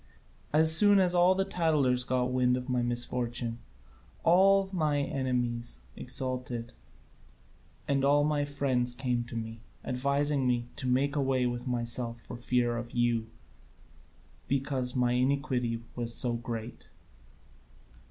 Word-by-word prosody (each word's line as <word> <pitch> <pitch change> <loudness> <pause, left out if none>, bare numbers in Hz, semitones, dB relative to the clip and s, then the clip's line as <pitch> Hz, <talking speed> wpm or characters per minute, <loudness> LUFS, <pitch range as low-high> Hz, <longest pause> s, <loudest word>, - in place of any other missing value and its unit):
As 160 +1 +7
soon 205 +2 +7
as 185 -2 +3
the 185 +2 +3
tattlers 145 -7 +1
got 125 0 -1
wind 125 0 +2
of 125 0 -6
my 125 -1 0
misfortune, 120 -1 -2 0.6
all 195 +3 +4
my 155 -5 0
enemies 120 - -3
exulted, 125 -2 -4 1.1
and 140 -1 +1
my 145 +1 +2
friends 130 -4 -1
came 125 -2 -1
to 120 - -10
me, 115 0 -6 0.2
advising 140 +1 0
me 120 -1 0
to 130 - -3
make 135 +3 +1
away 135 -3 +1
with 120 +1 -3
myself 120 -1 -2
for - - -10
fear 120 0 0
of 120 0 -7
you, 120 -2 0 1.2
because 135 -2 -1
my 125 -1 +1
iniquity 125 -2 -1
was 115 -1 -2
so 120 -1 +1
great." 115 0 -6
125 Hz, 125 wpm, -29 LUFS, 120-140 Hz, 1.2 s, As